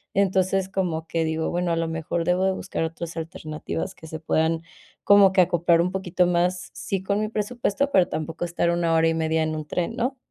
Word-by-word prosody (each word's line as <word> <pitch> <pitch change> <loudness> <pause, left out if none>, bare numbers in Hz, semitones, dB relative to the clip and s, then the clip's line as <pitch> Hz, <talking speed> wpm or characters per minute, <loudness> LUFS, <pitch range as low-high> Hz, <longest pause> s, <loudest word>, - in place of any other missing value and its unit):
Entonces, 190 -1 +2
como 175 -4 -2
que 165 0 0
digo, 160 0 -1
bueno, 175 0 0
a - - +2
lo 165 0 -1
mejor, 165 +1 -2
debo 180 +2 +2
de 190 - +2
buscar - - -3
otras 165 +1 -6
alternativas 160 +2 -5
que 160 - -13
se 160 0 -6
puedan 160 +1 0 0.4
como 200 -1 +7
que 190 -1 +5
acoplar 170 -1 +3
un 180 +2 +1
poquito 185 -1 0
más, 180 +1 0
sí, 190 -1 -3
con 200 +1 0
mi 215 - -1
presupuesto, 240 +4 -1
pero 185 -2 +4
tampoco 160 +2 -4
estar 170 0 0
1 170 -1 +1
hora 160 0 +4
y - - +1
media 160 0 +1
en 155 0 -2
un 155 -1 -5
tren, 180 +9 -2
¿no? 260 +3 -1
175 Hz, 215 wpm, -24 LUFS, 160-190 Hz, 0.4 s, como